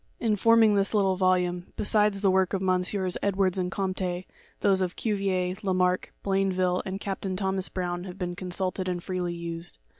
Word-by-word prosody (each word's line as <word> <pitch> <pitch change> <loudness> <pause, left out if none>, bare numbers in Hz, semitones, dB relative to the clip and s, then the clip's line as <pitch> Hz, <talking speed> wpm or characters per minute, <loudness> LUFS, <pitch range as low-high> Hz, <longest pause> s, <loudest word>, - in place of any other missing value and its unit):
In 220 -3 +1
forming 225 +1 +5
this 200 +1 +2
little 195 -2 +3
volume, 180 -1 +1
besides 210 -1 +2
the 195 -2 +4
works 190 0 +2
of 190 - -2
MM. 185 0 +1
Ed 200 -1 0
wards 190 -1 +1
and 180 0 -1
Comte, 185 -2 -2 0.4
those 195 -1 +4
of 180 -1 -1
Cuvier, 195 -4 -1
Lamarck, 185 -2 +1
Blainville 185 -2 +1
and 190 +1 -4
Cap 195 -2 -4
tain 190 -1 -2
Thomas 190 -1 -1
Brown 175 -1 -3
have 185 0 -8
been 180 -2 -3
consulted 185 +1 -3
and 175 -1 -3
freely 180 -2 -2
used. 170 0 -5
185 Hz, 180 wpm, -27 LUFS, 180-195 Hz, 0.4 s, forming